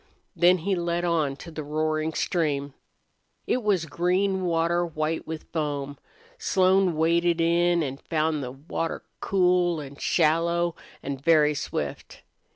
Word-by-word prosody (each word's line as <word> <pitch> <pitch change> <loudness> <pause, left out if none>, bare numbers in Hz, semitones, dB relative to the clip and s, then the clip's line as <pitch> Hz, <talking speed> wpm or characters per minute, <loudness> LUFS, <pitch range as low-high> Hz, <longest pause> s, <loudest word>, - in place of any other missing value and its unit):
Then 180 +1 +5
he 200 - +1
led 175 -1 -1
on 155 -5 +1
to 165 +4 -11
the 155 - -5
roaring 155 +1 -1
stream. 145 -6 -1 0.7
It 255 - 0
was 200 -6 +1
green 185 +4 0
water 170 0 +1
white 160 -1 -3
with 160 -1 -5
foam. 145 -3 -3 0.4
Slone 190 - +3
waded 170 +1 +2
in 170 0 +3
and 135 -1 -5
found 155 -1 0
the 125 - -4
water 155 +4 -4 0.2
cool 180 -3 +2
and 140 -1 -9
shallow 170 +1 +2 0.3
and 135 -1 -4
very 155 -2 +4
swift. 105 - -5
165 Hz, 135 wpm, -26 LUFS, 150-175 Hz, 0.7 s, Then